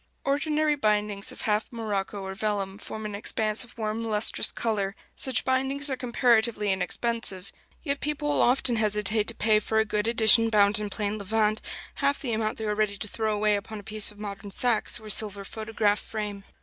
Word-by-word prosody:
Ordinary 300 +2 +1
bindings 210 -5 -1
of - - -5
half 210 0 0
morocco 205 -3 -3
or 190 0 -5
vellum 200 -1 -3
form 220 -1 -7
an 210 - -5
expanse 215 +2 0
of 240 - -17
warm 220 0 -3
lustrous 215 -1 +3
color; 205 -3 -2 0.2
such 260 -4 +3
bindings 270 +2 0
are - - 0
comparatively 235 -4 +2
inexpensive; 190 +1 -2 0.3
yet 280 -2 -1
people 300 0 -3
will 290 - +2
often 245 -1 +3
hesitate 210 0 +2
to 230 - +2
pay 215 0 +3
for 220 +1 -2
a 220 - +3
good 210 0 -1
edition 230 0 +6
bound 210 -1 +4
in 210 -1 -3
plain 205 +1 -2
levant 215 +1 0 0.4
half 280 0 +2
the 245 -5 -3
amount 220 0 -1
they 220 - -4
are 210 - 0
ready 210 -1 -1
to 215 - -6
throw 215 0 -2
away 210 0 +2
upon 210 +2 -6
a - - -12
piece 215 0 -1
of 210 - -18
modern 200 -1 -7
Saxe 235 +2 +2
or 220 - -15
a 215 - -5
silver 200 -2 -1
photograph 215 -1 -1
frame. 205 -2 -6
215 Hz, 195 wpm, -26 LUFS, 205-230 Hz, 0.4 s, edition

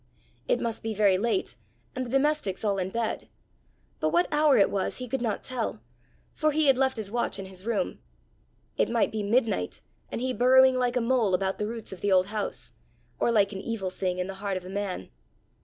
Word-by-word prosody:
It - - +2
must 230 -2 -3
be 220 -1 -3
very 200 -3 +4
late 235 - 0 0.4
and 255 - -1
the 245 - -6
domestics 270 -7 +1
all 200 -2 +1
in 185 0 -1
bed; 230 +2 -3 0.7
but 155 - +1
what 170 +3 +3
hour 295 -2 +4
it 200 - +4
was 195 -2 -1
he 255 - -5
could 265 +2 -2
not 220 -4 -1
tell, 245 - -3 0.5
for 310 - +1
he 310 +1 +2
had 270 -2 +6
left 265 -1 +1
his 210 -2 -4
watch 240 -2 -1
in 195 - -6
his 190 +2 -7
room. 230 -3 -1 0.8
It - - +2
might 235 -1 +2
be 220 - -2
midnight 210 - 0 0.3
and - - -3
he 255 +1 -1
burrowing 255 +1 +5
like 245 0 +1
a 250 - +2
mole 230 -5 +2
about 190 +1 -1
the 210 - -1
roots 225 -2 -5
of 185 - -11
the 205 - +1
old 185 -1 +5
house, 210 +1 -4 0.5
or - - +2
like 205 -3 +3
an 195 -2 -5
evil 205 -5 -3
thing 185 -1 -2
in 180 - -1
the 195 - -5
heart 200 -2 -1
of 180 - -8
a - - -8
man! 195 - -4
220 Hz, 220 wpm, -27 LUFS, 195-255 Hz, 0.8 s, had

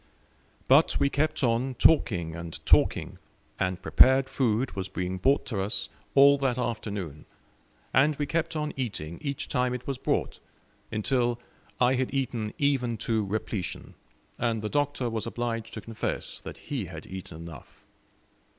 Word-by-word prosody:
But - - +5
we 140 - +2
kept 150 0 0
on 125 +2 +1
talking 90 - +3
and 85 -1 -6
talking, - - +3 0.4
and 95 0 -1
prepared 130 0 +6
food 125 -1 +1
was 95 -1 -4
being 90 0 -3
brought 135 +8 +3
to 105 -6 -2
us 100 +4 0 0.3
all 140 0 +7
that 130 -3 +1
afternoon; 100 - -4 0.7
and 145 +4 +4
we 145 - -1
kept 165 +2 -1
on 150 -1 -2
eating 95 - -4
each 140 -2 -3
time 125 -1 0
it 125 0 -7
was 135 -2 -3
brought, - - -1 0.5
until 120 +2 +1 0.4
I 125 +1 +4
had 130 0 0
eaten 120 -5 -1
even 135 -6 +1
to 110 -2 +1
repletion, 100 -1 -4 0.5
and 115 -2 0
the 105 - -2
Doctor 145 -2 0
was 115 -1 -2
obliged 115 -1 -3
to 110 - -5
confess 110 +2 -4
that - - -8
he - - -4
had - - -9
eaten 95 -4 -8
enough. 85 0 -11
120 Hz, 150 wpm, -28 LUFS, 105-135 Hz, 0.7 s, all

